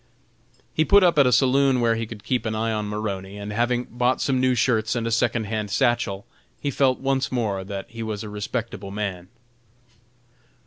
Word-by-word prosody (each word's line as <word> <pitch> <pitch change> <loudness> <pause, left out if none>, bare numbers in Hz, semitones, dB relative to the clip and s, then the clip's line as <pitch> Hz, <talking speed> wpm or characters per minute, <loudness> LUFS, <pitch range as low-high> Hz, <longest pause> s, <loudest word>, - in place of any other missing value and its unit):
He 155 - +3
put 200 +4 +5
up 170 -4 +4
at 140 - +6
a - - +3
saloon 135 +1 +4
where 115 -1 +3
he 115 0 -3
could 105 -2 -10
keep 125 0 -1
an 110 - -2
eye 115 +1 0
on 105 -1 -2
Maroney, 100 -2 -4
and 105 0 -6
having 120 +2 +1
bought 125 +1 0
some 130 -2 +1
new 130 -1 +3
shirts 115 -1 +1
and 115 -1 -1
a 115 - -1
second 115 0 +1
hand 105 0 -3
satchel, 110 -3 0 0.3
he 145 - -2
felt 130 -1 +2
once 135 0 0
more 105 -6 -1
that 100 0 -6
he 115 -1 -9
was 110 -2 -4
a 105 - -7
respectable 105 -1 -4
man. 100 -3 -4
115 Hz, 195 wpm, -24 LUFS, 105-125 Hz, 0.3 s, at